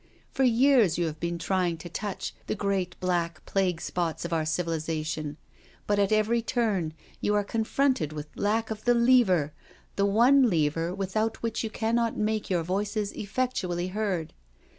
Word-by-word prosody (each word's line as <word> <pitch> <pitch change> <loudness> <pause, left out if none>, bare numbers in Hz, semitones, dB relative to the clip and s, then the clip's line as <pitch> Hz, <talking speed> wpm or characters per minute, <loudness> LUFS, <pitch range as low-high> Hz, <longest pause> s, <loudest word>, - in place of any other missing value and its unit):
For - - -2
years 240 - +4
you 175 - +1
have 155 -1 -4
been 170 +1 -2
trying 180 -1 0
to 175 - -9
touch 195 +3 -4
the - - -1
great 190 -3 -2
black 175 -2 -1
plague 185 -4 0
spots 170 -1 -2
of 170 - -3
our 160 -1 +1
civilisation, 155 -2 -2 0.5
but 205 0 +1
at 200 0 +2
every 215 +2 +2
turn 205 -10 -1 0.2
you 210 - +1
are 205 - +2
confronted 225 - 0
with 150 -1 -5
lack 220 +2 0
of 215 0 -6
the 245 0 +4
lever, 235 - +4 0.4
the 200 0 +3
one 245 +5 +5
lever 165 -1 +1
without 215 +4 -2
which 230 0 -1
you 225 - -2
cannot 230 +1 0
make 215 0 -1
your 175 -3 +1
voices 205 +3 -1
effectually 195 -6 -2
heard. 185 -5 -2
195 Hz, 160 wpm, -27 LUFS, 170-220 Hz, 0.5 s, one